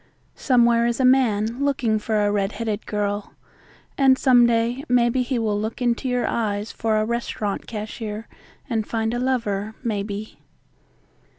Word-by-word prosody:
Somewhere 235 -2 +3
is 235 +1 -1
a 260 - +3
man 240 -1 +2
looking 245 -6 +1
for 210 -1 0
a 205 - +2
red 200 0 0
headed 220 -2 -4
girl 205 0 -2 0.7
and 265 -1 +5
some 245 -3 +5
day 235 +3 0
maybe 245 +1 +3
he 250 0 -1
will 210 -3 0
look 220 +1 -4
into 245 +1 0
your 250 0 0
eyes 210 -2 -2
for 220 -1 0
a 215 - +1
restaurant 225 -3 -3
cashier 215 0 -6 0.4
and 225 -5 -2
find 225 0 -1
a 240 - -1
lover, 220 -5 -1
maybe. 210 -1 -4
230 Hz, 155 wpm, -23 LUFS, 210-245 Hz, 0.7 s, and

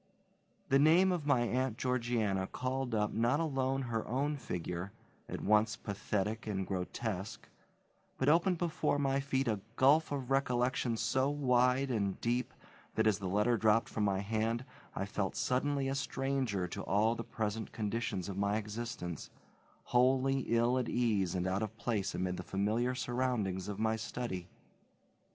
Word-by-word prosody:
The 135 - +5
name 170 +6 +6
of 165 -5 -2
my 135 -4 +4
Aunt 125 0 0
Georgiana 115 -6 0
called 130 0 -2
up 105 -1 0
not 120 +6 +2
alone 135 -4 0
her 115 -3 -2
own 140 +5 0
figure, 90 - -4 0.4
at - - -4
once 110 +1 +3
pathetic 105 +2 -3
and 95 -3 -1
grotesque, 100 +2 -4 0.7
but 130 - 0
opened 170 +4 +4
before 165 -4 0
my 135 -1 +1
feet 135 -1 0
a 110 -3 +1 0.2
gulf 145 +5 +4
of 135 -2 -3
recollection 125 -3 +1
so 130 +4 +1
wide 130 -1 +2
and 100 -5 -1
deep 120 +1 0 0.4
that, 110 - +2
as 110 -2 +3
the 95 - -3
letter 105 +5 +2
dropped 110 +2 +3
from 110 - -2
my 100 -1 +1
hand, 115 +3 -1 0.3
I 95 - -1
felt 100 -1 -2
suddenly 135 +2 0
a 135 - 0
stranger 135 -8 -1
to - - -5
all 110 +3 +2
the 115 - -5
present 110 -1 -3
conditions 105 -4 -2
of 100 -1 -4
my 100 +1 +1
existence, 105 -6 -5 0.5
wholly 130 +2 +3
ill 120 +2 +3
at 125 - -2
ease 105 -7 +1
and 90 0 -1
out 95 +2 0
of 110 0 -4
place 105 -6 -1
amid 90 0 -1
the - - -4
familiar 110 +6 0
surroundings 120 -7 -1
of 105 -1 -4
my 110 +1 +1
study. 110 -5 -4
115 Hz, 160 wpm, -33 LUFS, 105-130 Hz, 0.7 s, name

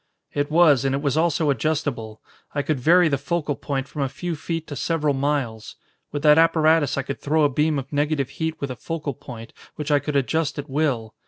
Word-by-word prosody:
"It 145 0 -1
was, 155 -5 +5
and 135 0 +1
it 140 - -2
was 140 -2 +1
also 160 -2 +2
adjustable. 135 -6 -2 0.3
I 145 - 0
could 150 -3 -1
vary 170 +6 +5
the 140 -3 0
focal 150 0 -2
point 135 -1 -3
from 145 - -6
a 135 - 0
few 175 +4 -4
feet 165 +1 -4
to 145 - -7
several 150 -1 0
miles. 135 -5 -2 0.4
With 145 0 -4
that 150 +1 +7
apparatus 160 -3 +3
I 140 - 0
could 140 +1 -5
throw 155 +2 +2
a 145 - +4
beam 150 +2 +1
of 135 +1 -6
negative 145 -2 0
heat 160 +1 -3
with 140 -2 -3
a - - -5
focal 150 +3 -4
point 115 -2 -10 0.2
which 150 0 -4
I 145 - +5
could 145 +1 -4
adjust 145 +2 0
at 145 0 -5
will. 135 -6 -1
145 Hz, 220 wpm, -23 LUFS, 135-155 Hz, 0.4 s, that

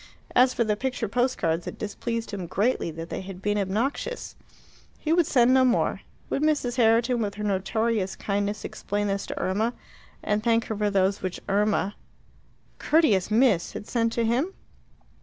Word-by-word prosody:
As 250 +1 +6
for 245 - +1
the 215 -2 +1
picture 250 0 -2
post 245 +5 0
cards, 165 +1 -1
it - - -6
displeased 230 +2 -4
him 190 -4 -5
greatly 205 +1 0
that 165 +1 -7
they - - -3
had 190 -1 -8
been 205 +2 0
obnoxious. 230 - -2 0.6
He 315 - 0
would 340 -2 +3
send 250 -1 +4
no 260 0 +5
more. 250 -1 +1 0.3
Would - - 0
Mrs. 290 -5 +1
Herriton, 235 +1 +3
with 205 -2 -2
her 210 - -5
notorious 205 0 0
kindness, 205 +1 -2
explain 205 +1 -3
this 200 -1 -2
to - - -5
Irma, 215 +6 0 0.5
and 210 0 0
thank 230 -1 +2
her 220 - -3
for 210 0 0
those 195 0 +1
which 185 -1 -4
Irma 205 0 +1 0.9
(courteous 270 - +3
Miss!) 215 -5 +3
had - - -6
sent 230 -1 +1
to 235 - 0
him? 260 +12 0
215 Hz, 175 wpm, -26 LUFS, 200-245 Hz, 0.9 s, As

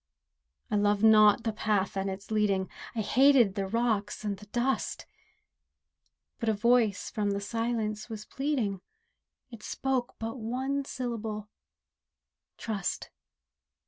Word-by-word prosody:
I 210 - +2
loved 205 0 +2
not 215 0 +7
the 225 - -1
path 205 -3 0
and 195 0 -1
its 195 +3 -7
leading, 200 -3 +1 0.2
I 225 - 0
hated 250 -1 +5
the 195 -1 -2
rocks 220 -1 0
and 205 -1 -1
the 210 +2 -13
dust; 245 +5 -1 1.3
But 230 -3 0
a - - +3
Voice 225 -1 +2
from 210 -2 -1
the 200 0 0
Silence 220 0 -2
was 215 -1 -6
pleading, 250 -10 -1 0.7
It 230 -2 -10
spoke 260 +1 -2
but 225 +3 -5
one 265 +5 -2
syllable—"Trust." 215 -3 -7
215 Hz, 120 wpm, -29 LUFS, 205-240 Hz, 1.3 s, not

